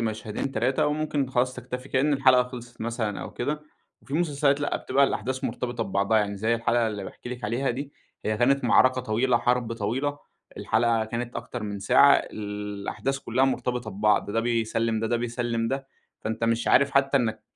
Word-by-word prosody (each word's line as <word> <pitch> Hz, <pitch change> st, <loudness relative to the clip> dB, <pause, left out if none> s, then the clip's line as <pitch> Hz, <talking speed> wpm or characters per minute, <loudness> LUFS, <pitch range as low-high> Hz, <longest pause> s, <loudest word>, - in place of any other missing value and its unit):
مشهدين، 110 Hz, +3 st, -3 dB
3 130 Hz, +4 st, +1 dB
وممكن 150 Hz, -3 st, -1 dB
خلاص 125 Hz, 0 st, +1 dB
تكتفي، 125 Hz, +1 st, -7 dB
كأن 145 Hz, +3 st, +2 dB
الحلقة 130 Hz, -2 st, +5 dB
خلصت 125 Hz, -1 st, -10 dB
مثلًا 110 Hz, -3 st, -2 dB
أو -, -, -6 dB
كده، 150 Hz, +4 st, -3 dB, 0.4 s
وفي 135 Hz, -, -7 dB
مسلسلات 145 Hz, -3 st, +2 dB
لأ، 145 Hz, -, 0 dB
بتبقى 140 Hz, +2 st, +2 dB
الأحداث 130 Hz, +3 st, -2 dB
مرتبطة 120 Hz, -1 st, -2 dB
ببعضها، 100 Hz, +3 st, +2 dB
يعني 100 Hz, -1 st, -1 dB
زي 110 Hz, +4 st, +1 dB
الحلقة 115 Hz, 0 st, +1 dB
اللي 105 Hz, -3 st, -4 dB
باحكي 120 Hz, -, -9 dB
لِك 125 Hz, -2 st, -6 dB
عليها 120 Hz, +6 st, 0 dB
دي 140 Hz, +4 st, -5 dB, 0.3 s
هي 110 Hz, 0 st, 0 dB
كانت 135 Hz, +3 st, +2 dB
معركة 130 Hz, +1 st, +4 dB
طويلة، 120 Hz, +1 st, +1 dB
حرب 120 Hz, -2 st, 0 dB
طويلة، 130 Hz, +7 st, -2 dB, 0.4 s
الحلقة 115 Hz, 0 st, +1 dB
كانت 120 Hz, +2 st, -4 dB
أكتر 120 Hz, -3 st, -6 dB
من 100 Hz, -1 st, -4 dB
ساعة، 140 Hz, +8 st, +6 dB
الأحداث 105 Hz, +5 st, -3 dB
كلها 130 Hz, +1 st, +1 dB
مرتبطة 125 Hz, -3 st, -1 dB
ببعض، 105 Hz, +1 st, +1 dB
ده 115 Hz, -, +1 dB
بيسلم 115 Hz, -1 st, 0 dB
ده، 115 Hz, -, 0 dB
ده 120 Hz, -, +1 dB
بيسلم 115 Hz, -1 st, -2 dB
ده، 135 Hz, 0 st, -3 dB, 0.3 s
فأنت 110 Hz, +1 st, -2 dB
مش 115 Hz, 0 st, +1 dB
عارف 140 Hz, +1 st, +5 dB
حتى 140 Hz, 0 st, +3 dB
إنك 110 Hz, -4 st, 0 dB
120 Hz, 180 wpm, -26 LUFS, 110-130 Hz, 0.4 s, ساعة